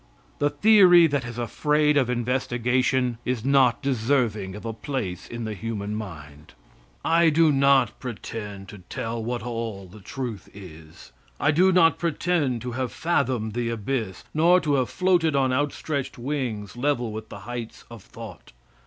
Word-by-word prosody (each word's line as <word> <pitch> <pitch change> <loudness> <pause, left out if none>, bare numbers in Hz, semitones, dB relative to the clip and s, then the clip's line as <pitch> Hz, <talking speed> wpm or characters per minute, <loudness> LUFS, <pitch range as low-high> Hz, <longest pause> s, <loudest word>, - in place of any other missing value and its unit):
The 145 - +2
theory 180 +1 +6
that 145 -5 0
is 120 0 -7
afraid 150 +5 +1
of 130 -4 +2
investigation 125 0 0
is 125 -2 -2
not 135 -3 +3
deserving 115 -6 0
of 105 - -9
a 115 - -3
place 105 -8 -4
in 120 0 -6
the 110 - -3
human 105 0 -4
mind. 75 - -9 0.5
I 165 0 +4
do 160 0 +4
not 135 -4 +3
pretend 105 -5 -7
to 105 - -10
tell 115 +5 -5
what 120 0 -3
all 115 -4 -5
the 95 +4 -14
truth 110 0 -6
is. 80 -8 -13 0.3
I - - +3
do 180 +5 +4
not 170 -3 +4
pretend 160 -7 0
to 125 - -4
have 125 -1 -3
fathomed 125 -4 -1
the 120 0 -2
abyss, 110 -3 -3
nor 170 +4 +5
to 150 - 0
have 130 -3 +1
floated 175 -5 +2
on 130 -2 +2
outstretched 145 0 -2
wings 120 -7 -4
level 125 -3 -1
with 110 +1 -7
the - - -9
heights 120 -1 -7
of 115 -3 -10
thought. 105 - -12
120 Hz, 160 wpm, -25 LUFS, 110-145 Hz, 0.5 s, theory